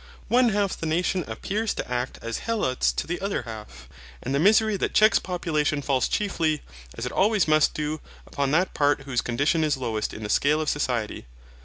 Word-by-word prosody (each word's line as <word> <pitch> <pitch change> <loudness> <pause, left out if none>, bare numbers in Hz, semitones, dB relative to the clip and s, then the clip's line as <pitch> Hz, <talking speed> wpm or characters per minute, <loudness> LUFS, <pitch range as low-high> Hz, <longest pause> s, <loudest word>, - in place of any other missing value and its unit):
One 245 0 +4
half 205 -2 0
the 165 - -5
nation 175 +3 0
appears 200 - -2
to - - -4
act 125 +1 -3
as 115 0 -3
Helots 210 - 0
to - - -2
the 175 +2 -4
other 200 -8 -2
half, 105 - -10 0.4
and 130 - -3
the 140 - +2
misery 215 +4 +4
that - - -2
checks 215 +1 +6
population 155 -5 -1
falls 135 -3 +1
chiefly, 165 -7 -1 0.3
as - - -4
it - - -3
always 210 -2 +2
must 155 -1 +3
do, 150 0 -3 0.2
upon 140 -1 -2
that 175 +6 +1
part 145 -1 +2
whose 130 -3 -1
condition 145 +7 +1
is 150 -2 +1
lowest 115 -4 -2
in 110 - -8
the 105 - -4
scale 150 +6 +3
of 155 - -1
society. 120 - -2
150 Hz, 195 wpm, -25 LUFS, 130-190 Hz, 0.4 s, checks